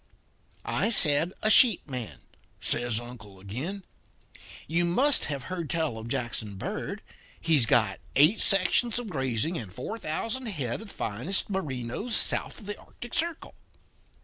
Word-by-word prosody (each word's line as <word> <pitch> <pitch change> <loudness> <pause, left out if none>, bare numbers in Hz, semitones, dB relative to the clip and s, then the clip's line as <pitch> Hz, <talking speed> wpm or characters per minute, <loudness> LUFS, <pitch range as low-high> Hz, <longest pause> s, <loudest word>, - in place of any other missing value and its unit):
"'I - - +1
said 165 -5 +5
a 215 - +3
sheep 225 -6 +6
man,' 120 - -7 0.4
says 120 -2 0
Uncle 120 -5 -11
Emsley 95 - -17
again. 140 - -6 0.8
'You 170 +3 +1
must 260 +12 +2
have 140 -4 -4
heard 175 -2 -5
tell 160 -9 -1
of 110 - -8
Jackson 120 -5 -3
Bird. 95 - -5 0.4
He's 150 -8 +4
got 110 -5 +3 0.2
eight 155 +10 +5
sections 200 +4 +3
of 245 -3 -4
grazing 135 +3 -1
and 105 -6 -9
four 130 - -6
thousand 225 +11 -3
head 140 - -3
of 220 - -10
the - - -10
finest 125 - -1
Merinos 155 - -2
south - - 0
of - - -13
the 205 +1 -6
Arctic 240 - -12
Circle.' 335 0 -2
155 Hz, 150 wpm, -27 LUFS, -, 0.8 s, sheep